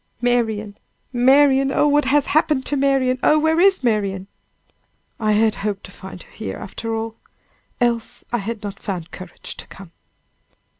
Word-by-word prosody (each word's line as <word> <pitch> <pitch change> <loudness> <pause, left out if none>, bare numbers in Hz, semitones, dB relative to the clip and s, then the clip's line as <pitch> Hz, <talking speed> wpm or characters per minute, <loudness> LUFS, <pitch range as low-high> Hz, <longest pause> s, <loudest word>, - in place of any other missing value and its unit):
"Marian! 220 -4 0 0.3
Marian! 270 +2 +4
oh! 295 - +3
what 295 0 +3
has 285 +1 +3
happened 300 -3 +1
to 290 - 0
Marian! 270 -2 +2
Oh! 305 - +4
where 320 +1 +2
is 385 -4 +4
Marian?" 200 -5 0 0.9
"I 215 -1 +2
had 220 +1 +3
hoped 205 -1 -3
to - - -11
find 190 -2 -10
her - - -22
here 95 - -6
after 225 +3 -5
all! 225 0 -4 0.6
else 240 0 -1
I 240 - +2
had 220 +1 -5
not 205 -1 -6
found 180 -4 -5
courage 185 -1 -9
to - - -9
come!" 190 -3 -13
235 Hz, 160 wpm, -21 LUFS, 205-275 Hz, 0.9 s, Marian